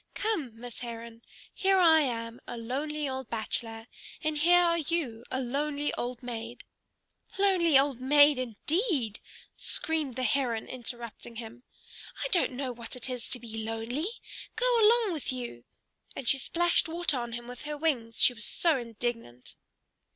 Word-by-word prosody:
Come, 300 - -2
Miss 245 -1 -6
Heron! 230 -1 -7 0.3
Here 385 0 +3
I 325 -3 +7
am 230 -3 -3
a 240 - -5
lonely 285 +6 -2
old 265 -2 -4
bachelor, 225 0 -3 0.4
and 310 -1 0
here 355 +3 +6
are 335 -1 +3
you 295 -8 -2
a 260 - -2
lonely 285 +3 -1
old 245 0 -4
maid" 235 -1 -6 0.7
"Lonely 365 -7 +4
old 270 -2 +2
maid, 290 +1 +6
indeed!" 255 - 0 0.3
screamed 310 -6 -1
the 255 - -2
Heron 240 -2 +1
interrupting 240 -1 -7
him. 230 +1 -8 0.6
"I - - -1
don't 350 - +2
know 260 0 -3
what 235 -1 -7
it 250 +1 -3
is 245 -2 -4
to 250 - -3
be 225 -1 -6
lonely. 225 - -2 0.5
Go - - +2
along 445 -2 +5
with 305 -5 -2
you!" 240 - -6 0.5
and 255 - -6
she 270 - +5
splashed 345 +3 +2
water 325 -5 +2
on 240 -1 -5
him 240 0 -6
with 245 0 -8
her 300 0 -4
wings, 250 -8 -1
she 250 - +6
was 230 -3 -2
so 330 -4 +2
indignant. 230 - -5
255 Hz, 160 wpm, -29 LUFS, 235-310 Hz, 0.7 s, I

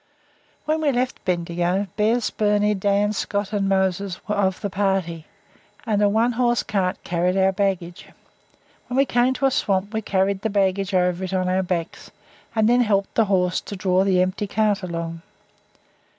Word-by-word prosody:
When 310 +1 0
we 295 -2 +2
left 250 0 -2
Bendigo, 175 +1 0
Bez, 225 +2 +1
Birnie, 210 0 +2
Dan, 205 +1 +1
Scott, 205 0 -3
and 200 -1 0
Moses 190 -1 0
were 210 - 0
of 190 -2 0
the 205 - -2
party, 190 -5 -1 0.6
and 210 -3 +1
a 205 - +4
one 225 +4 +2
horse 240 0 +1
cart 190 -3 -1
carried 180 +2 0
our 190 0 +4
baggage. 185 -3 -2 0.8
When 250 - -3
we 275 - +5
came 245 +1 +2
to 275 - -1
a 270 - +3
swamp 200 -6 0
we 220 - -1
carried 195 -1 0
the 220 - -1
baggage 195 -1 0
over 180 0 +1
it 185 0 -4
on 185 -1 0
our 185 +1 +1
backs, 175 -2 -4 0.5
and 220 -1 +3
then 245 +1 +4
helped 200 -4 +1
the 225 - +3
horse 180 -2 +1
to 205 - -8
draw 185 -1 +1
the 185 -2 +3
empty 185 +3 -3
cart 210 -1 +1
along. 165 -2 -5
195 Hz, 180 wpm, -22 LUFS, 185-215 Hz, 0.8 s, we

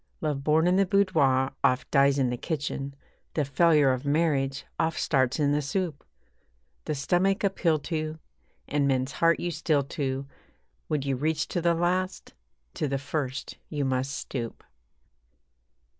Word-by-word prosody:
Love 150 -3 -2
born 155 +3 +3
in 180 +1 +3
the 195 - +4
boudoir 155 -10 +3
oft 130 0 +2
dies 140 -1 +4
in 130 -3 +2
the - - -1
kitchen, 140 -1 -4 0.4
The 150 - +1
failure 150 -1 +4
of 130 +1 -4
marriage 140 -2 +1
oft 160 0 0
starts 130 -1 +1
in 145 -1 +3
the 145 +1 +2
soup. 155 +1 -2 0.8
The 155 - -1
stomach 185 +8 +1
appeal 185 -5 +2
to, 155 +1 -3 0.5
and 140 -1 +1
men's 130 0 +1
heart 165 +4 +2
you 175 - -2
steal 155 -2 +1
to 135 -1 -3 0.6
Would 150 -3 -1
you 135 -1 0
reach 150 +2 0
to 175 - -1
the 170 0 +3
last? 180 +2 -1 0.4
To 150 - -2
the 135 0 -1
first 140 -1 -4
you 145 -2 -2
must 130 +1 0
stoop. 120 -4 -5
145 Hz, 155 wpm, -27 LUFS, 135-165 Hz, 0.8 s, the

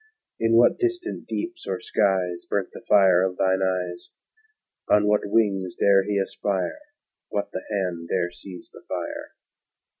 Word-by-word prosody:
In 115 0 +3
what 120 - +5
distant 360 0 -2
deeps 345 0 -5
or - - -2
skies 95 -5 0
Burnt - - -1
the - - -9
fire 95 -3 +6
of 95 -1 -1
thine 95 0 +2
eyes? 90 -2 -2 0.8
On 105 0 +5
what 105 0 +3
wings 100 -4 +1
dare 100 -1 +5
he 105 0 0
aspire? 100 - -2 0.5
What 100 0 -3
the - - -4
hand 90 -5 -2
dare 90 -2 0
seize 90 0 -10
the - - -13
fire? - - -5
95 Hz, 150 wpm, -24 LUFS, 90-105 Hz, 0.8 s, fire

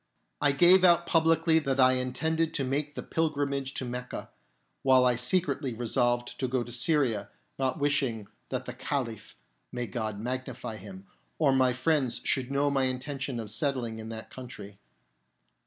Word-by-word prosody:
I 145 -1 +4
gave 175 +6 +6
out 170 -1 +5
publicly 165 -1 +3
that 135 -3 -1
I 130 0 +6
intended 160 +6 0
to 140 - 0
make 145 +3 -2
the - - -5
pilgrimage 140 -4 -1
to 130 - -3
Mecca, 125 0 -6 0.5
while 130 -1 +5
I 125 -1 +4
secretly 135 -1 0
resolved 120 +1 0
to 130 - 0
go 125 -1 0
to 120 - -9
Syria, 120 -4 +1 0.3
not 130 +1 0
wishing 140 -8 0 0.2
that - - -3
the - - -5
Caliph 120 -7 -4 0.4
(may 125 -1 -3
God 110 -1 -4
magnify 125 -1 -4
him) 190 - -11 0.3
or 145 -4 +3
my 130 -1 +4
friends 130 -1 +1
should 130 -2 +1
know 140 +1 +1
my 135 -1 +2
intention 130 0 -3
of 110 -2 -6
settling 125 -6 -1
in 110 0 -7
that 110 0 -8
country. 105 -6 -10
130 Hz, 160 wpm, -29 LUFS, 120-145 Hz, 0.5 s, gave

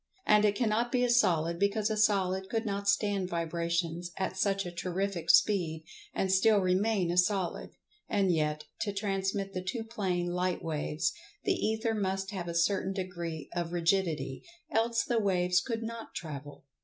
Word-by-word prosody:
And 210 0 +5
it 205 -1 +3
cannot 235 +1 +1
be 250 -1 +2
a 245 - +3
Solid, 170 -8 +3
because 205 +2 +1
a - - +1
Solid 190 -3 +2
could 225 0 -1
not 200 -1 -1
stand 200 -2 +1
vibrations 170 0 -1
at 190 -1 -2
such 195 0 +1
a 175 - -5
terrific 180 0 -3
speed, 165 -6 +4 0.3
and 190 - 0
still 205 +3 +5
remain 190 0 +2
a 175 - -2
Solid. 185 0 0 0.3
And 195 -2 +2
yet, 150 -1 0 0.2
to 205 - -1
transmit 195 -1 -2
the 185 - -2
two 225 +5 -3
plane 185 -6 -2
light 180 0 -1
waves, 155 -1 -1 0.3
the 390 - +2
Ether 220 -7 0
must 195 -1 -1
have 185 -4 -4
a 170 - -4
certain 190 +2 +1
degree 170 -4 -5
of 175 -1 -3
Rigidity, 165 -6 0 0.3
else 230 -2 +2
the 235 -2 +1
waves 180 -3 +2
could 230 -1 -3
not 230 0 -7
travel. 145 -4 -7
190 Hz, 165 wpm, -30 LUFS, 175-210 Hz, 0.3 s, And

